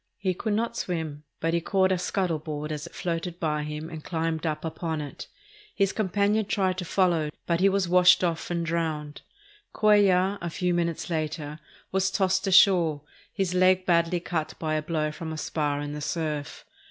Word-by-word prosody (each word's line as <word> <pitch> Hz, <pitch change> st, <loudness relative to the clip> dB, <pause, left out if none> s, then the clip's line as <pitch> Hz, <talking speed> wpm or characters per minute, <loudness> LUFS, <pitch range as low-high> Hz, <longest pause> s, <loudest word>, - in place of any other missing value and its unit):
He 190 Hz, -2 st, 0 dB
could 215 Hz, +4 st, -2 dB
not 230 Hz, +2 st, -1 dB
swim, 160 Hz, -7 st, -4 dB
but 165 Hz, +1 st, 0 dB
he 170 Hz, -, +1 dB
caught 190 Hz, +2 st, +2 dB
a 185 Hz, -, +2 dB
scuttle 180 Hz, -3 st, -1 dB
board 150 Hz, 0 st, -5 dB
as 150 Hz, +1 st, -4 dB
it -, -, -15 dB
floated 175 Hz, -1 st, -3 dB
by 150 Hz, -2 st, 0 dB
him 150 Hz, +1 st, -5 dB
and 160 Hz, -2 st, -7 dB
climbed 165 Hz, -1 st, -2 dB
up 155 Hz, +1 st, -3 dB
upon 160 Hz, 0 st, -3 dB
it. 145 Hz, -2 st, -7 dB, 0.5 s
His 195 Hz, -1 st, +2 dB
companion 205 Hz, +1 st, +1 dB
tried 190 Hz, -2 st, 0 dB
to 180 Hz, -, -4 dB
follow, 170 Hz, -4 st, +2 dB, 0.2 s
but 170 Hz, -1 st, +1 dB
he 195 Hz, +1 st, +5 dB
was 195 Hz, -2 st, +1 dB
washed 180 Hz, +1 st, +6 dB
off 170 Hz, -2 st, -1 dB
and 170 Hz, -1 st, -1 dB
drowned. 160 Hz, -3 st, -2 dB, 0.5 s
Cuellar, 200 Hz, -2 st, +4 dB
a 170 Hz, -, -3 dB
few 180 Hz, +1 st, -1 dB
minutes 170 Hz, 0 st, -1 dB
later, 155 Hz, -1 st, -3 dB, 0.3 s
was 190 Hz, 0 st, +2 dB
tossed 190 Hz, 0 st, +1 dB
ashore, 175 Hz, -6 st, +5 dB, 0.3 s
his 190 Hz, -3 st, -1 dB
leg 185 Hz, 0 st, +4 dB
badly 170 Hz, 0 st, +2 dB
cut 165 Hz, -2 st, -3 dB
by 155 Hz, -1 st, -2 dB
a 155 Hz, -, +1 dB
blow 155 Hz, -1 st, -1 dB
from 160 Hz, +1 st, -6 dB
a 160 Hz, -, -5 dB
spar 150 Hz, -2 st, -1 dB
in 145 Hz, 0 st, -4 dB
the 150 Hz, -, -5 dB
surf. 150 Hz, -1 st, -3 dB
170 Hz, 190 wpm, -26 LUFS, 155-185 Hz, 0.5 s, washed